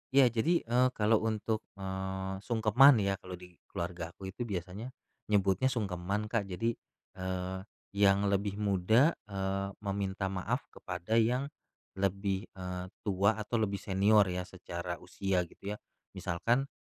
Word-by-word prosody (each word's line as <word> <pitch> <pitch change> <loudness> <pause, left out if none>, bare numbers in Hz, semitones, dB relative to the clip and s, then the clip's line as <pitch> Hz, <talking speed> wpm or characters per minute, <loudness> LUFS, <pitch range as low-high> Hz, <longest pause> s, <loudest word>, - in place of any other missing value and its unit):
Iya, 130 -4 +7
jadi, 165 +10 +2
eee, 125 +2 +3
kalau 110 +1 +4
untuk, 110 0 0 0.2
eee, 95 0 -3
sungkeman 120 +5 +6
ya 100 0 0
kalau 90 -1 -7
di 90 -1 -15
keluarga 85 -1 -5
aku 95 -1 -7
itu 120 +4 -5
biasanya, 95 +4 -4 0.4
nyebutnya 100 +3 +3
sungkeman 100 -2 -2
Kak, 105 -4 0
jadi, 115 +6 0 0.5
eee, 95 0 -3 0.3
yang 100 0 +4
lebih 100 0 0
muda, 105 - +4 0.2
eee, 95 0 -2 0.2
meminta 95 -1 -2
maaf 105 +7 -1
kepada 95 +5 -1
yang 125 +5 +1 0.5
lebih, 100 +1 0
eee, 90 -1 -4 0.2
tua 100 +1 +3
atau 110 +2 -2
lebih 100 -2 0
senior 100 +2 +5
ya 90 0 -3
secara 85 -1 -5
usia 95 0 0
gitu 100 +4 -7
ya. - - -12 0.4
Misalkan 120 +11 0
100 Hz, 140 wpm, -32 LUFS, 95-110 Hz, 0.5 s, Iya